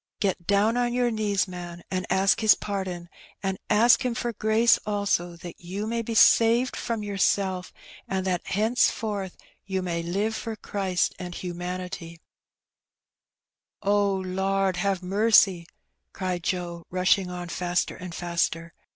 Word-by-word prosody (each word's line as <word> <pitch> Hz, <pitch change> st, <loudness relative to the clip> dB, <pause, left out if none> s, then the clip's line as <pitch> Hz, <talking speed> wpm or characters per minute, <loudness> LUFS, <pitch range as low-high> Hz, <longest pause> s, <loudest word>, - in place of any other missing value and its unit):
Get 190 Hz, -4 st, -1 dB
down 205 Hz, +4 st, +3 dB
on 240 Hz, -1 st, +1 dB
your 245 Hz, -1 st, +2 dB
knees^ 210 Hz, -3 st, 0 dB
man^ 175 Hz, -2 st, -8 dB
and 185 Hz, -1 st, -2 dB
ask 195 Hz, +3 st, +3 dB
His 220 Hz, -2 st, +6 dB
pardon^ 190 Hz, -4 st, -4 dB, 0.4 s
and 190 Hz, -1 st, -2 dB
ask 230 Hz, +5 st, +5 dB
Him 250 Hz, -2 st, -1 dB
for 240 Hz, 0 st, -2 dB
grace 220 Hz, +2 st, +3 dB
also 200 Hz, -4 st, -1 dB
that 170 Hz, 0 st, -10 dB
you 190 Hz, +4 st, -4 dB
may 230 Hz, +1 st, -1 dB
be 230 Hz, 0 st, -4 dB
saved 230 Hz, +3 st, +5 dB
from 230 Hz, -3 st, -3 dB
yourself, 195 Hz, -2 st, 0 dB, 0.4 s
and 190 Hz, -1 st, -2 dB
that 180 Hz, -2 st, 0 dB
hence 220 Hz, +5 st, +2 dB
forth 205 Hz, -4 st, -4 dB, 0.3 s
you 190 Hz, -1 st, -2 dB
may 170 Hz, -2 st, -2 dB
live 200 Hz, +6 st, -1 dB
for 225 Hz, 0 st, -4 dB
Christ 195 Hz, -4 st, -1 dB
and 180 Hz, -1 st, -6 dB
humanity/' 180 Hz, -1 st, -6 dB, 0.9 s
" -, -, -36 dB
O 200 Hz, 0 st, +2 dB
Lord, 190 Hz, 0 st, 0 dB
have 190 Hz, 0 st, -1 dB
marcy! 195 Hz, -3 st, +4 dB, 0.4 s
^' -, -, -54 dB
cried 185 Hz, -2 st, -3 dB
Joe, 175 Hz, -1 st, -3 dB
rushing 185 Hz, +1 st, +2 dB
on 180 Hz, -1 st, -6 dB
faster 175 Hz, +1 st, -1 dB
and 180 Hz, -2 st, -8 dB
faster. 170 Hz, -1 st, -2 dB
190 Hz, 150 wpm, -26 LUFS, 180-210 Hz, 0.9 s, His